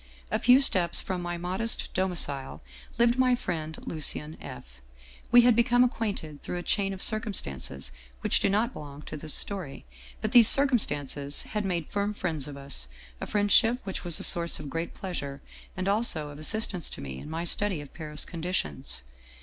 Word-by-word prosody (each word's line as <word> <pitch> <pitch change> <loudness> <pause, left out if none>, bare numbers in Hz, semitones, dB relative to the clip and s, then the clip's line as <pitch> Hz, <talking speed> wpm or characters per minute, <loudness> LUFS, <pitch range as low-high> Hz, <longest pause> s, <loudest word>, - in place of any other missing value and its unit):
" - - -25
A - - +1
few 250 +1 +6
steps 180 - +3
from 185 -2 -3
my 175 0 -4
modest 185 +6 -2
domicile 170 - -1 0.3
lived 235 +2 +3
my 255 -1 +4
friend 160 -8 -4
Lucien 155 0 -1
F. 65 0 -11 0.5
We 240 0 +9
had 240 -1 +5
become 245 +1 +4
acquainted 200 - -3
through 180 - -4
a 175 - -5
chain 195 +1 +1
of 190 -1 -3
circumstances 70 - 0 0.3
which - - +2
do - - +2
not 220 +5 +1
belong 145 0 -9
to - - -7
this 155 0 -1
story, 185 - -4 0.3
but 215 - -2
these 235 -3 +8
circumstances 145 - +1
had 210 -2 -3
made 175 -4 -2
firm 205 +1 -1
friends 160 -8 -3
of 145 -1 -8
us, 140 - -2 0.3
a - - -4
friendship 215 +3 +4
which 190 -1 -5
was 175 -3 +1
a - - -3
source 170 -1 +3
of 140 - -7
great 165 +1 -4
pleasure 140 -7 -5 0.4
and 185 +1 -2
also 200 -8 +1
of 145 0 -10
assistance 185 0 +1
to - - -8
me 65 -2 -6
in - - -9
my 165 +2 -3
study 190 0 +1
of 145 -1 -10
Paris 150 -2 -4
conditions. 75 - -4
175 Hz, 180 wpm, -28 LUFS, 145-210 Hz, 0.5 s, We